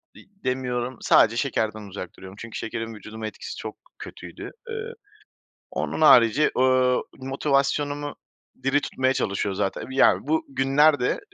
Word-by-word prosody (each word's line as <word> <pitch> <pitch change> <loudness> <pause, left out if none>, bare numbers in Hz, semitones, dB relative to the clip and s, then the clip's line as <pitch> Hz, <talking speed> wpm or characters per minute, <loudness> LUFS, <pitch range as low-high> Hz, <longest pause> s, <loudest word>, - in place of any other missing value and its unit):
di - - -13 0.2
demiyorum, 125 -1 -2
sadece 115 +2 +4
şekerden 110 -5 -1
uzak 90 -2 -6
duruyorum 95 +1 -11
çünkü 115 -1 -7
şekerin 115 0 -4
vücuduma 110 +1 -7
etkisi - - -8
çok - - -6 0.2
kötüydü. - - -9 0.2
Eee, 455 +1 -5 0.8
onun - - -3
harici, 135 -1 +6
ııı, 130 0 +3 0.2
motivasyonumu 145 +2 0 0.5
diri 135 +2 +2
tutmaya 130 -1 0
çalışıyor 100 -3 -1
zaten. 95 0 -2
Ya, 130 0 +5
bu 155 +3 0
günlerde, 135 +1 +3
130 Hz, 125 wpm, -24 LUFS, 110-140 Hz, 0.8 s, harici